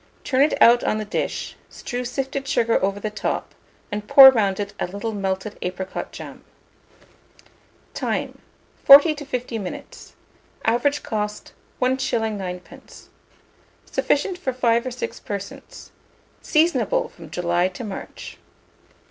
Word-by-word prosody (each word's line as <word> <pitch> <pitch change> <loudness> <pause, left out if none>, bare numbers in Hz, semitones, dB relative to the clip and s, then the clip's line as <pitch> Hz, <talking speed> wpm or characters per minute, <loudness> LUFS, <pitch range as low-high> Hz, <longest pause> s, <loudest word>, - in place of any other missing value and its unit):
Turn 260 -1 +1
it 295 - +2
out 240 +1 +6
on 215 - 0
the 215 - -4
dish, 205 - -3
strew 245 +1 -5
sifted 270 +2 -4
sugar 230 -8 +1
over 195 +1 0
the 215 +1 -4
top, 215 - -3 0.4
and 210 0 -4
pour 265 +2 +10
round 200 -6 0
it 200 0 -4
a - - -1
little 200 +5 -5
melted 195 +1 -3
apricot 185 +1 -5
jam. - - -10 1.5
Time. - - -3 0.4
40 285 +3 +9
to 295 -1 -9
50 250 -4 -3
minutes. 190 -3 -9 0.5
Average 260 +6 +1
cost, 210 -1 -4 0.3
1s. 250 -4 0
9d. 180 -2 -9 0.8
Sufficient 355 +5 0
for 260 -7 -2
5 235 -1 +1
or - - -3
6 250 - -5
persons. 200 -1 -8 0.5
Seasonable 345 +10 +1
from 165 -4 -14
July 175 +1 0
to 185 +5 -8
March. 205 -3 -8
225 Hz, 130 wpm, -22 LUFS, 200-265 Hz, 1.5 s, pour